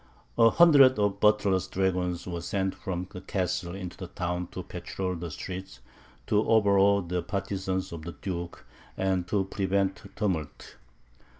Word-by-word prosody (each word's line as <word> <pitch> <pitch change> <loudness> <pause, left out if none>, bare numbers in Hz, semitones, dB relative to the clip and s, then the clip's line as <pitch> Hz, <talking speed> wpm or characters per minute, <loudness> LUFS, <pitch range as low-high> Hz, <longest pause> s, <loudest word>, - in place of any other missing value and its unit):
A 115 - +6
hundred 140 -4 +7
of 100 -1 +1
Buttler's 100 -3 +3
dragoons 90 -2 -1
were 85 -2 -4
sent 95 +2 -1
from 90 -1 -4
the 90 - -8
Castle 90 -2 -2
into 90 -2 -6
the 90 - -7
town 90 -1 -3
to - - -7
patrol 95 -1 -4
the 85 -1 -5
streets, 90 +1 -7 0.5
to 105 +1 +2
overawe 100 -2 +4
the 90 +1 -2
partisans 95 -1 -3
of 85 -2 -6
the 85 +2 -7
Duke, 85 -2 -5 0.3
and 95 -2 0
to 100 +2 +1
prevent 95 0 -1
tumult. 90 -8 -3
95 Hz, 145 wpm, -28 LUFS, 90-100 Hz, 0.5 s, hundred